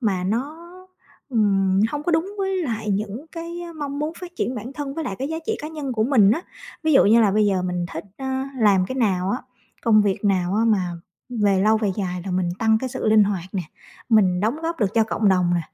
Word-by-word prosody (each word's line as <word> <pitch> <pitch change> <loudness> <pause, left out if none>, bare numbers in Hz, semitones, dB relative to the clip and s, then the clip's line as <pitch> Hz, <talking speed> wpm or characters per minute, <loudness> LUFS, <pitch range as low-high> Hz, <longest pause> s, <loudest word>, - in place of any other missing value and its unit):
mà 195 -6 0
nó, 245 +10 -2 0.7
ừm, 195 -5 +2
hông 295 +3 -3
có 345 - 0
đúng 340 +5 0
với 385 -1 0
lại 225 -7 -3
những 210 +8 -3
cái 335 +1 -6 0.2
mong 285 -2 -4
muốn 300 +2 -2
phát 355 -1 -9
triển 255 - -1
bản 240 +3 -6
thân 285 -2 -5
với 320 - -3
lại 195 - -4
cái 270 - -3
giá 320 - -3
trị 445 - 0
cá 300 - -5
nhân 300 -4 -5
của 220 -2 +1
mình 225 -6 +5
á. 270 +10 0 0.4
Ví 315 -1 +2
dụ 270 - +6
như 225 +3 +6
là 215 -3 +4
bây 210 +1 +3
giờ 190 -2 +1
mình 180 -1 -2
thích, 160 - -5
ờ, 265 - -5 0.3
làm 200 -5 +4
cái 260 - -5
nào 190 -6 +1
á, 245 - 0 0.4
công 215 -2 +5
việc 200 0 -1
nào 185 -2 +1
á 220 +2 +2
mà 190 -6 +1 0.4
về 205 -5 +1
lâu 215 +2 +4
về 215 -2 0
dài 180 -3 -3
là - - -3
mình 180 -1 0
tăng 220 -1 +3
cái 260 - -2
sự 240 - -4
linh 215 -1 +6
hoạt 195 -4 -2
nè, 190 - -2 0.5
mình 190 -6 +4
đóng 220 +7 0
góp 330 +1 -2
được 205 -1 0
cho 225 -1 +4
cộng 220 -1 +1
đồng 180 -2 +3
nè, 175 - +1
220 Hz, 245 wpm, -22 LUFS, 195-275 Hz, 0.7 s, dụ